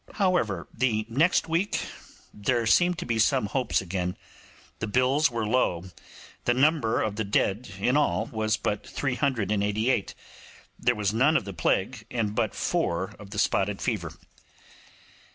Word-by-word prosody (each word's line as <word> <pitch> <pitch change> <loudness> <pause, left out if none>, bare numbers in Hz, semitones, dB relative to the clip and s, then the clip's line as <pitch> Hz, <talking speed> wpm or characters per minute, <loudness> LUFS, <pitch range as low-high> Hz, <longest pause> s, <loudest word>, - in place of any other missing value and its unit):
However, 175 - +1
the 115 -3 0
next 155 +11 +2
week 170 +5 0 0.5
there 115 +3 0
seemed 175 +9 +4
to 175 - -5
be 115 -2 -1
some 130 +1 +3
hopes 125 +2 0
again; 90 -1 -3 0.6
the 110 - -2
bills 130 +7 +3
were 115 -2 -2
low, 95 -6 0 0.5
the 120 - +3
number 135 -4 +2
of 105 -1 -3
the 110 - 0
dead 100 +2 0
in 125 +7 +1
all 150 0 +2
was 110 0 0
but 105 - -2
388, 110 -4 0 0.6
there 120 - +2
was 105 -1 -1
none 135 +8 +4
of - - -3
the 100 - -6
plague, 100 +7 -1
and 110 -4 -1
but 110 0 -1
four 85 +3 -1
of 105 -2 -11
the 100 - -8
spotted 100 -1 +1
fever. - - -2
110 Hz, 150 wpm, -27 LUFS, 100-130 Hz, 0.6 s, seemed